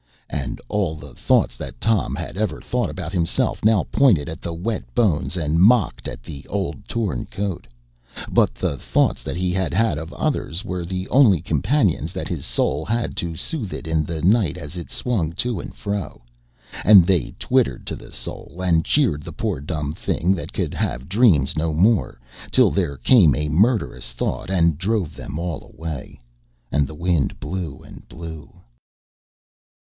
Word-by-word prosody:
And - - -3
all 95 -7 0
the 75 - -11
thoughts - - +2
that - - -8
Tom 115 -3 +1
had - - -5
ever 105 +2 -1
thought 125 -1 -1
about 90 -1 -6
himself 85 -3 0
now 110 -3 +4
pointed 105 - +4
at 80 -1 -6
the 85 - -4
wet 105 +7 -3
bones 90 -6 +1
and 80 0 +1
mocked 110 +2 +4
at - - -7
the 70 - -9
old 100 +1 -3
torn 100 - -2
coat. 100 -3 -4 0.6
But - - +3
the 70 - -2
thoughts - - +1
that - - -4
he 90 +1 0
had 95 -2 -1
had 105 -5 +2
of 80 - -7
others 90 +7 -2
were 90 -3 -3
the 95 +2 -4
only 120 - +5
companions 120 - +1
that - - -4
his - - -3
soul 75 - 0
had 115 +6 -1
to 85 -2 -2
soothe 115 - -3
it - - -6
in 80 -1 +1
the 80 0 -4
night 100 -3 +3
as 75 +5 -8
it 85 - -7
swung 95 -11 -1
to 120 +2 -1
and - - -8
fro. 100 - -4 0.6
And 100 -5 +8
they 90 -7 +1
twittered 65 -2 +1
to - - -2
the - - -12
soul 70 +8 -6
and 85 -3 +3
cheered 120 - +2
the - - -8
poor - - -2
dumb 75 -1 -3
thing 90 +3 0
that 85 - -7
could - - -2
have 65 +5 -2
dreams 95 - +4
no 80 0 0
more, 95 - +2 0.3
till - - +5
there 85 -8 -1
came 75 - +5
a 75 +1 -1
murderous 100 - +1
thought - - -3
and 85 -5 +3
drove 95 -5 -1
them 75 - -6
all 85 -3 -4
away. 80 -4 -6 0.5
And 70 -1 +2
the 75 - -9
wind 85 -3 0
blew 85 -8 -4
and - - -14
blew. 80 -2 -9
90 Hz, 175 wpm, -22 LUFS, 80-105 Hz, 0.6 s, And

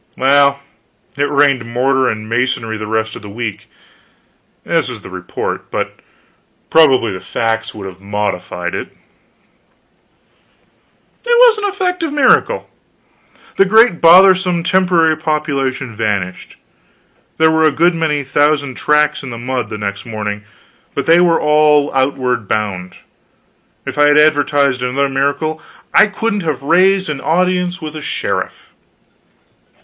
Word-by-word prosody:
Well, 140 +1 +3 0.6
it 145 +1 -1
rained 140 -3 +2
mortar 130 +3 0
and 110 0 -5
masonry 115 -1 -1
the 110 0 -6
rest 110 0 -2
of - - -9
the 105 - -10
week. 110 -1 -6 1.0
This - - 0
was - - -9
the - - -11
report; - - -5
but - - -4 0.7
probably 135 -9 +4
the 95 - -6
facts 110 +4 -3
would 100 -2 -8
have 95 0 -10
modified 100 -3 -4
it. - - -4 2.4
It - - -14
was 475 -2 +5
an 415 - -3
effective 360 -5 -2
miracle. 295 - +2 0.9
The 195 - +5
great 220 -2 +4
bothersome 180 0 +5
temporary 175 -3 +2
population 140 -6 -3
vanished. 100 -4 -3 0.8
There 160 0 +4
were 160 0 +2
a 155 - +4
good 170 +5 +2
many 155 -3 -1
thousand 145 -1 0
tracks 150 0 +1
in 135 - -8
the 120 - -7
mud 125 -2 -4
the 110 - -6
next 100 +1 -5
morning, 105 -2 -5 0.5
but - - -2
they 165 +2 +5
were 170 -2 +3
all 150 -1 +3
outward 130 -4 -1
bound. 95 -4 -3 0.9
If - - -5
I 145 - +5
had 145 0 +4
advertised 145 -3 +2
another 135 +3 -1
miracle 145 +4 -2 0.3
I - - +6
couldn't 210 0 -2
have 150 -6 -3
raised 185 +5 +3
an 150 -3 -4
audience 180 +1 -1
with 155 0 -7
a 155 - -6
sheriff. - - -4
140 Hz, 135 wpm, -15 LUFS, 115-165 Hz, 2.4 s, I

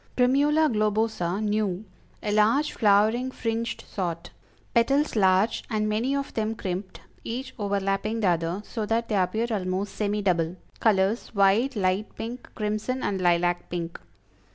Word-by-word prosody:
Primula 290 +5 +4
Globosa, 215 - 0
new; 210 -2 -1 0.4
a 210 - -1
large 220 +8 +3
flowering, 220 +4 +3
fringed 230 -2 -3
sort; 170 -4 -4 0.4
petals 275 +5 +2
large 190 +1 +3
and 215 -2 0
many 230 +6 0
of 280 0 -3
them 220 0 -1
crimped, 185 -1 -5 0.2
each 255 +3 -5
overlapping 200 +2 -1
the 195 - +3
other, 170 +3 -1
so 225 - -4
that 230 +1 0
they 215 - +1
appear 195 +4 +1
almost 195 -1 -2
semi 210 0 -1
double; 170 -2 +1 0.2
colors 210 +1 +2
white, 205 +7 +3
light 190 +1 0
pink, 240 +3 -6
crimson 215 +4 -2
and 195 -2 -1
lilac 175 0 +2
pink. 170 -1 -4
210 Hz, 140 wpm, -26 LUFS, 190-230 Hz, 0.4 s, Primula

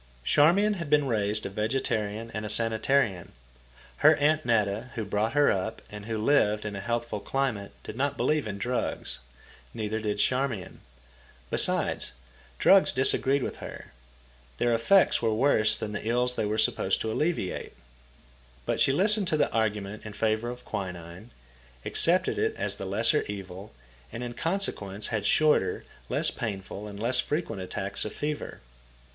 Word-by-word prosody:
Charmian 175 - +4
had 170 -4 -5
been 150 -1 +4
raised 105 -4 0
a - - -2
vegetarian 110 0 -2
and 110 - -4
a 105 - -4
sanitarian. 115 -3 0 0.6
Her - - +6
Aunt 155 +2 +2
Netta, 110 0 0
who 110 - -3
brought 105 +3 -1
her 145 0 +4
up 95 +4 -3
and 105 0 -8
who 115 -1 -2
lived 105 -3 +2
in 105 -1 -4
a - - -4
healthful 120 0 -2
climate, 120 -6 -2
did - - -7
not 140 +2 -1
believe 150 -6 +1
in 100 -1 -4
drugs. 120 - -3 0.6
Neither 110 0 -2
did 105 -1 -2
Charmian. 125 -4 -1 0.7
Besides, - - -1 0.4
drugs 195 -1 +5
disagreed 135 +1 +2
with - - -4
her. - - -9 0.7
Their 120 - +2
effects 150 +13 +4
were 110 -2 +1
worse 110 -4 +3
than 105 - -4
the 105 - -4
ills 125 +1 +1
they 110 - -1
were 105 +1 -1
supposed 100 -3 +1
to 110 - -2
alleviate. 150 - -2 0.9
But - - -1
she - - +5
listened 200 +6 +3
to 155 - +1
the - - +1
argument 105 -2 -1
in 110 - -8
favour 110 +2 0
of 125 0 -8
quinine, 90 +2 -6 0.6
accepted - - +2
it - - 0
as - - -1
the 95 - -5
lesser 110 +4 +2
evil, 100 0 -7 0.4
and 120 - -5
in 120 -1 -5
consequence 115 - -2
had 110 -3 -1
shorter, 150 -12 +2 0.2
less - - +1
painful, 100 -1 -5
and 100 -1 -8
less 120 +3 +1
frequent 135 - -2
attacks 95 +1 -3
of 105 - -6
fever. 150 0 -4
110 Hz, 160 wpm, -28 LUFS, 105-135 Hz, 0.9 s, Her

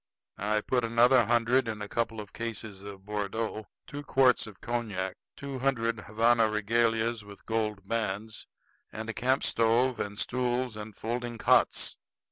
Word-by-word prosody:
I 105 +2 +1
put 125 +2 0
another 120 +2 +5
hundred 120 +2 +3
in 110 -2 -3
a 105 - -5
couple 115 0 -2
of 105 -1 -9
cases 110 -4 -5
of 100 -1 -10
Bordeaux, 105 +1 -3 0.2
two 145 - -7
quarts 130 -4 +3
of 105 -3 -12
cognac, 105 -6 -3 0.2
two 140 -2 -5
hundred 115 -4 0
Havana 115 +2 +3
regalias 115 +1 +1
with 100 -1 -13
gold 105 -3 -2
bands, 110 -1 -3 0.4
and 110 +1 -4
a - - -10
camp 130 +4 +1
stove 115 +3 +2
and 105 0 -3
stools 125 0 -1
and 105 -1 -8
folding 120 +1 -3
cots. - - +3
115 Hz, 150 wpm, -29 LUFS, 105-120 Hz, 0.4 s, another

